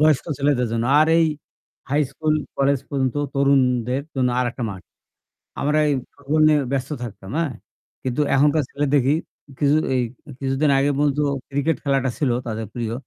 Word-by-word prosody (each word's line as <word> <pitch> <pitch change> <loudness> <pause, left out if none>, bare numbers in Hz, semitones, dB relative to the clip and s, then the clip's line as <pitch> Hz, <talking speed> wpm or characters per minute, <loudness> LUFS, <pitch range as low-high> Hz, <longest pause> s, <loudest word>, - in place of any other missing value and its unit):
বয়স্ক 155 -3 +4
ছেলেদের 140 -3 +2
জন্য। 115 0 0 0.2
আর 155 - +5
এই 165 - +5 0.7
হাই 145 - +2
স্কুল 155 -1 0 0.2
কলেজ 140 0 +2
পর্যন্ত 135 -2 -1 0.2
তরুণদের 130 -2 +2
জন্য 130 -1 +2
আরেকটা 120 0 -2
মাঠ। 95 -2 -9 0.8
আমরা 150 +2 +1
এই - - +2 0.2
ফুটবল 145 +2 -1
নিয়ে 150 -1 +4
ব্যস্ত 135 0 -2
থাকতাম, 105 -4 -8
হ্যাঁ? 165 -5 0 0.5
কিন্তু 130 +3 -2
এখনকার 145 +3 +4
ছেলে 145 +1 -1
দেখি 140 +1 +4 0.4
কিছু 145 0 +3 0.2
এই 125 - +2 0.4
কিছুদিন 135 +2 +1
আগে 140 +1 +2
পর্যন্ত 145 0 +1 0.3
ক্রিকেট 145 +2 0
খেলাটা 135 -2 +1
ছিল 140 -4 +1 0.2
তাদের 110 -1 -3
প্রিয়। 115 -2 -3
140 Hz, 155 wpm, -22 LUFS, 125-145 Hz, 0.8 s, আর